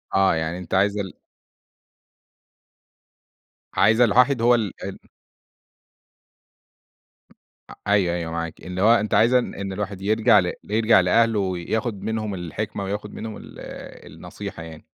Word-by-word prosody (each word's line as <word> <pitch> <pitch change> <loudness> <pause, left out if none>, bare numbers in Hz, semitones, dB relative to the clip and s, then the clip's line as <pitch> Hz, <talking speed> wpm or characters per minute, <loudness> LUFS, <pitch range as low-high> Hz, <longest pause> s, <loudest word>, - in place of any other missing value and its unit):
آه 95 -3 +4
يعني 80 +2 -2
أنت 90 - -8
عايز 100 +2 +2
ال 95 -3 -4 2.6
عايزة 115 +3 +4
الواحد 125 +3 +3
هو 120 +1 +5
ال 110 -5 -2
ال - - -6 2.7
آآ، - - -10
أيوه، 95 -4 +2
أيوه، 85 -1 -4
معاكِ 85 0 -4
اللي 90 +1 -4
هو 115 +3 +6
أنتِ 110 -2 -1
عايزة 120 +3 +5
إن 100 -5 -5
الواحد 100 -1 -5
يرجع 110 +2 +4
ل 90 -1 -1
يرجع 110 0 +3
لأهله 115 +4 +3
وياخد 100 +4 -2
منهم 110 -2 -2
الحكمة 100 +3 -5
وياخد 105 +2 -5
منهم 110 -1 -6
ال - - -11 0.7
النصيحة 80 - -8
يعني. 80 -1 -11
100 Hz, 130 wpm, -23 LUFS, 90-110 Hz, 2.7 s, هو